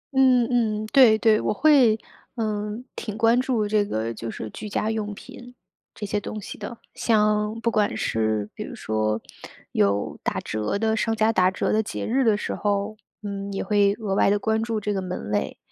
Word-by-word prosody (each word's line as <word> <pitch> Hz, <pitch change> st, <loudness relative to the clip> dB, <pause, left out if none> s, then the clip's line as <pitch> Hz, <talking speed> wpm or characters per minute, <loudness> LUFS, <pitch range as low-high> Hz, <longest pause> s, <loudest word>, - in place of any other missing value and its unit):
嗯， 255 Hz, -2 st, +5 dB
嗯， 215 Hz, -3 st, +1 dB
对， 245 Hz, -6 st, +7 dB
对。 220 Hz, -1 st, +3 dB
我 -, -, 0 dB
会， 255 Hz, -4 st, +4 dB, 0.4 s
嗯， 215 Hz, +1 st, -3 dB
挺 215 Hz, -2 st, -5 dB
关 230 Hz, +2 st, +4 dB
注 235 Hz, -5 st, 0 dB
这 210 Hz, 0 st, +2 dB
个 115 Hz, -, -3 dB
就 115 Hz, +1 st, -6 dB
是 110 Hz, -, -6 dB
居 210 Hz, -, -7 dB
家 215 Hz, +2 st, -1 dB
用 210 Hz, -1 st, -3 dB
品 245 Hz, +4 st, -12 dB, 0.4 s
这 210 Hz, -, -5 dB
些 205 Hz, +1 st, -1 dB
东 215 Hz, -, -6 dB
西 205 Hz, -, -8 dB
的。 235 Hz, -, -7 dB, 0.2 s
像 210 Hz, 0 st, +1 dB
不 230 Hz, -, +1 dB
管 215 Hz, +1 st, +1 dB
是 110 Hz, -2 st, 0 dB
比 -, -, -9 dB
如 -, -, -8 dB
说 110 Hz, 0 st, -1 dB, 0.5 s
有 100 Hz, 0 st, 0 dB
打 -, -, -2 dB
折 105 Hz, -, -2 dB
的 220 Hz, +1 st, +1 dB
商 225 Hz, 0 st, 0 dB
家 220 Hz, 0 st, +2 dB
打 185 Hz, -2 st, +4 dB
折 185 Hz, -, -1 dB
的 220 Hz, -, +3 dB
节 220 Hz, -, -5 dB
日 260 Hz, +4 st, +1 dB
的 215 Hz, -3 st, +3 dB
时 -, -, -3 dB
候， 205 Hz, +1 st, -1 dB, 0.3 s
嗯， 200 Hz, -1 st, -5 dB
也 195 Hz, -, -2 dB
会 200 Hz, 0 st, +3 dB
额 210 Hz, -4 st, -3 dB
外 195 Hz, -, +3 dB
地 205 Hz, -, +3 dB
关 220 Hz, +2 st, 0 dB
注 225 Hz, -1 st, -1 dB
这 210 Hz, 0 st, -2 dB
个 195 Hz, -, -1 dB
门 180 Hz, -, -5 dB
类。 105 Hz, -, -1 dB
210 Hz, 215 characters per minute, -24 LUFS, 200-225 Hz, 0.5 s, 对